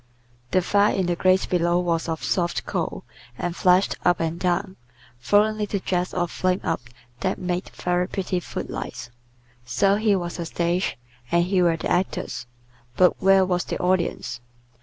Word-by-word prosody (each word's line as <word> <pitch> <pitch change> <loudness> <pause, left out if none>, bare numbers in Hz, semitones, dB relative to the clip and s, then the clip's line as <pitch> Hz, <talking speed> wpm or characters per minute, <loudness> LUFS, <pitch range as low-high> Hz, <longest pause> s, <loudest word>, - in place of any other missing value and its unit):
The 185 +5 +2
fire 205 +3 +3
in 190 -2 +1
the 175 0 0
grate 185 +2 +3
below 175 -1 +2
was 170 -2 -1
of 160 -1 -3
soft 175 -2 0
coal, - - -3 0.3
and 175 -1 -3
flashed 185 +1 +3
up 175 -1 +3
and 165 +1 -2
down, 185 +2 0 0.5
throwing 210 - +3
little 205 -1 -1
jets 180 -1 -1
of 175 -2 -1
flame 185 0 0
up 165 - -1 0.4
that 190 - -1
made 180 0 -3
very 180 0 -1
pretty 185 -2 -2
foot - - -6
lights. - - -6 0.5
So 125 +12 +2
here 210 -2 +3
was 175 -1 -5
a 170 - -3
stage, 175 +3 -1 0.3
and 170 0 +4
here 180 -1 +2
were 165 -1 +3
the - - -3
actors, 175 -8 -1 0.5
but 180 -1 +4
where 195 0 +5
was 180 -1 0
the - - -4
audience? 170 -9 -1
180 Hz, 170 wpm, -24 LUFS, 170-190 Hz, 0.5 s, where